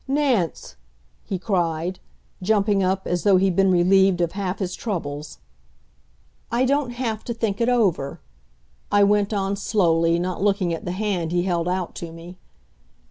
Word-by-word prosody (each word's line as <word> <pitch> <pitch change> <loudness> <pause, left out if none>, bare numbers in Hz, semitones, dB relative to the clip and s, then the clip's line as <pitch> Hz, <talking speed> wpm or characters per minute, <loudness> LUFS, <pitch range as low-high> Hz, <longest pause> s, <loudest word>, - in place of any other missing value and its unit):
"Nance!" 265 - 0 0.5
he 195 - -3
cried, 175 -2 -1 0.4
jumping 205 0 +2
up, 190 +1 0
as 175 -1 -1
though 200 -2 +4
he'd 190 -1 +2
been 195 +1 +4
relieved 185 +1 +4
of 170 -1 +1
half 190 -1 -3
his 185 -3 -3
troubles. 150 -9 -5 1.1
"I 240 +2 +2
don't 280 0 +1
have 230 -3 -3
to 235 - -4
think 220 -2 -2
it 230 - +2
over," 195 - +1 0.7
I 205 0 +5
went 205 0 +2
on 200 -1 -1
slowly, 170 -5 +2
not 180 +1 -3
looking 195 -4 +1
at 165 - -6
the 175 - -2
hand 185 -5 -2
he 175 0 +1
held 175 -2 -1
out 180 -1 -2
to 170 -1 -6
me. 170 +2 -11
190 Hz, 160 wpm, -23 LUFS, 175-205 Hz, 1.1 s, I